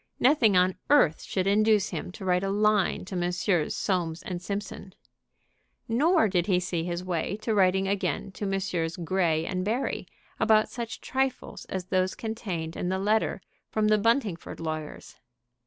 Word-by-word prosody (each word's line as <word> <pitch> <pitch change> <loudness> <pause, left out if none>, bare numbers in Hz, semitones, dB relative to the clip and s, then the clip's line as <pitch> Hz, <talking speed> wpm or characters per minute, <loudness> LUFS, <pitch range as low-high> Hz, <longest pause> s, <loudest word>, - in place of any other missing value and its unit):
Nothing 240 -7 +4
on 180 +1 +3
earth 280 - +4
should 185 -1 -2
induce 210 0 +3
him - - -5
to 190 - -8
write 180 0 +2
a 195 - -1
line 205 -2 +2
to 190 - -6
Messrs. 175 -1 0
Soames 175 -4 -1
& - - -2
Simpson. 195 -1 -5 0.9
Nor 285 +3 +3
did 180 -2 0
he 185 -3 +3
see 175 -2 -2
his 175 +1 -3
way 185 +2 -2
to 225 - 0
writing 190 -1 +3
again 200 0 -1
to 200 +2 -4
Messrs. 185 -4 -2
Grey 170 -2 0
& - - -3
Barry 230 +7 -2 0.3
about 215 -1 +4
such 235 -2 -6
trifles 265 -1 -2
as 185 -1 -4
those 185 0 0
contained 190 -8 -4
in 180 - -2
the 190 - 0
letter 210 0 +1 0.3
from 215 -1 +1
the 215 0 +4
Buntingford 225 -5 0
lawyers. 155 -2 -6
190 Hz, 160 wpm, -27 LUFS, 180-215 Hz, 0.9 s, Nothing